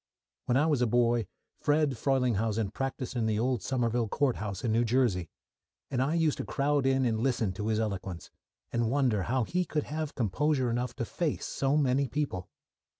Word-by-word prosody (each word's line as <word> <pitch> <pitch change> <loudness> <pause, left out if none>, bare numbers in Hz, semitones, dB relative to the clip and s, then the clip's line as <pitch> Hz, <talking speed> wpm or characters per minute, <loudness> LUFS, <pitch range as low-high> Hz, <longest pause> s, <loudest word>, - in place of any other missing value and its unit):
When 125 - +2
I 145 - +4
was 150 -5 +2
a 125 - +3
boy, 120 -2 +2 0.3
"Fred" 150 0 +2
Frelinghuysen 115 -5 +1
practised 135 -1 -3
in 115 -2 +1
the 110 -1 +1
old 125 +2 0
Somerville 120 -3 0
Courthouse 110 -6 -1
in 115 - +1
New 115 +2 +3
Jersey, 115 -8 +1 0.6
and 130 -2 +1
I 145 +5 +1
used 160 -3 +1
to - - -1
crowd 140 -1 +1
in 135 -1 +3
and 110 -2 +1
listen 120 -5 +1
to 105 +3 -4
his 110 -1 +1
eloquence, 95 -5 -4 0.4
and 120 -1 +1
wonder 125 -6 +2
how 125 +6 0
he 180 +10 0
could 155 -3 -2
have 155 0 -4
composure 130 +3 +1
enough 120 +1 -2
to 115 - -2
face 160 +5 -2
so 135 +2 0
many 140 -1 +2
people. 135 -11 -3
125 Hz, 185 wpm, -29 LUFS, 110-140 Hz, 0.6 s, I